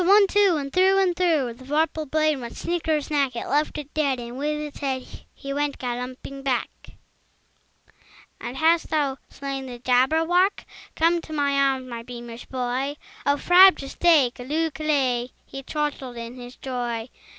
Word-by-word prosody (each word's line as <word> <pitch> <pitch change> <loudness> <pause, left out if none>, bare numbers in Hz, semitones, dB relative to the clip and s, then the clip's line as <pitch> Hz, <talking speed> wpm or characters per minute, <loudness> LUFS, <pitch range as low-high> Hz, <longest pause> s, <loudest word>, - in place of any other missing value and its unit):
One, 400 +3 +6
two! 400 -2 +3
And 275 -2 -5
through 380 +1 +4
and 375 -3 +2
through 320 -9 +1
The 250 +3 -15
vorpal 305 +2 -1
blade 310 -1 +2
went 235 -2 -8
snicker 320 -3 0
snack! 280 -3 0
He 235 - -4
left 300 +2 0
it 295 -1 -7
dead, 280 -4 +1
and 240 0 -7
with 300 +3 -2
its 300 -1 -7
head 265 -3 -2 0.3
He 275 -1 -6
went 290 0 -1
galumphing 250 +2 -5
back. 260 -3 0 1.7
"And 245 +2 -6
hast 325 +2 +3
thou 285 -3 0
slain 275 -1 -5
the 245 -1 -7
Jabberwock? 320 +10 +2 0.3
Come 335 +1 +3
to 315 - -9
my 285 -2 +1
arms, 270 -2 +1
my 235 -2 -6
beamish 240 0 -9
boy! 260 +2 -2 0.3
O 285 0 +3
frabjous 355 -5 +6
day! 310 -8 +4
Callooh! 305 +6 -2
Callay!" 270 -6 0 0.2
He 270 - -8
chortled 275 -4 -3
in 235 0 -6
his 245 0 -10
joy. 240 -3 -4
280 Hz, 160 wpm, -24 LUFS, 255-315 Hz, 1.7 s, One